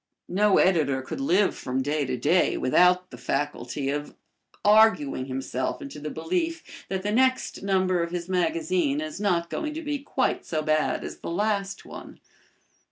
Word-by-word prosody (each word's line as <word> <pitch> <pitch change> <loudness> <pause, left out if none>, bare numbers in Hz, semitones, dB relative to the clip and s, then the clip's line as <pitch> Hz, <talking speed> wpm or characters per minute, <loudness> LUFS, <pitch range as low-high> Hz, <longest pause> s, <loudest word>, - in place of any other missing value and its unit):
No 200 +2 +3
editor 145 -8 +2
could 130 - -6
live 205 -6 +2
from 130 +1 -2
day 145 +1 0
to 125 - -2
day 155 +9 +2
without 180 +6 +3
the - - -10
faculty 140 -1 -2
or 145 0 -5 0.5
arguing 205 -11 +4
himself 130 0 -3
into 140 +2 -8
the 150 +1 -5
belief 330 - -2 0.3
that 190 -1 -2
the 205 - -1
next 260 +3 +1
number 185 -2 +1
of 170 - -2
his 175 0 -4
magazine 310 - 0
is 310 -6 -5
not 170 -4 0
going 305 -1 -3
to 325 - -5
be 295 -1 -2
quite 270 -1 -1
so 155 -2 -2
bad 155 0 +1
as - - -7
the - - -6
last 195 +1 -1
one. - - -10
180 Hz, 165 wpm, -26 LUFS, 150-220 Hz, 0.5 s, arguing